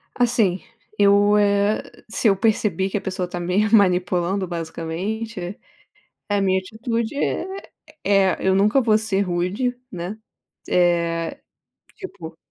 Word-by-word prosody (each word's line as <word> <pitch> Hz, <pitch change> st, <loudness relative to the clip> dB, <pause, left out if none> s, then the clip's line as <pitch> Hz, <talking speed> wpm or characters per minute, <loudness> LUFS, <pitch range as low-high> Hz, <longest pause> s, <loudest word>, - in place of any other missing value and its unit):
Assim 225 Hz, -7 st, +2 dB, 0.4 s
eu, 205 Hz, +1 st, +5 dB
eh, 205 Hz, +1 st, +2 dB, 0.3 s
se 225 Hz, +1 st, 0 dB
eu 195 Hz, -2 st, +4 dB
perceber 210 Hz, -2 st, +1 dB
que 200 Hz, -, -1 dB
a -, -, -4 dB
pessoa 185 Hz, -1 st, -3 dB
está 175 Hz, 0 st, -6 dB
me 180 Hz, +5 st, +1 dB
manipulando 185 Hz, -1 st, +2 dB
basicamente 175 Hz, +4 st, -5 dB, 0.7 s
a 205 Hz, -1 st, +1 dB
minha 190 Hz, -1 st, +2 dB
atitude 225 Hz, +4 st, -3 dB
é 380 Hz, +6 st, -3 dB, 0.3 s
é 195 Hz, -2 st, +3 dB
eu 190 Hz, -, +4 dB
nunca 210 Hz, +7 st, +4 dB
vou 220 Hz, -3 st, +4 dB
ser 210 Hz, -3 st, -1 dB
rude, 195 Hz, +8 st, -1 dB
né. 180 Hz, +4 st, -5 dB, 0.5 s
Eh 170 Hz, -2 st, +1 dB, 0.6 s
tipo. 180 Hz, -, -9 dB
195 Hz, 125 wpm, -22 LUFS, 180-215 Hz, 0.7 s, eu